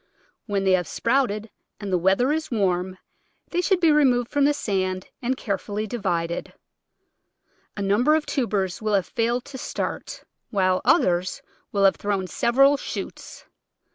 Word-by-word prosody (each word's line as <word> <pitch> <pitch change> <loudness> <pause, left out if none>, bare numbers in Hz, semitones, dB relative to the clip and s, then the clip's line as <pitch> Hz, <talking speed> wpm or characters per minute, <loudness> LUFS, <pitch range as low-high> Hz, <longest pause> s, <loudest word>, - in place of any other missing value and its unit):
When 200 -1 0
they 190 - +3
have 180 -3 +2
sprouted 230 -3 0 0.3
and 200 -3 -4
the - - +4
weather 195 - +3
is 315 +1 -2
warm 185 -4 0 0.5
they 355 - +1
should 370 0 +2
be 330 -3 +4
re 300 0 +5
moved 245 -3 +2
from 285 -1 +3
the 295 - +4
sand 185 -6 -2 0.2
and 255 +2 -1
carefully 205 0 -3
divided. 170 -7 -3 1.2
A 200 - -2
num 200 +4 +2
ber 305 +1 +5
of 315 - 0
tubers 205 - -1
will 215 -1 +1
have 195 - +1
failed 235 +1 -1
to 280 -2 -9
start, - - -5 0.3
while 185 -3 +1
others 180 +1 +2 0.3
will 200 -1 +2
have 195 - +4
thrown 200 -2 -1
several 275 +9 +3
shoots. - - -7
210 Hz, 160 wpm, -24 LUFS, 190-260 Hz, 1.2 s, re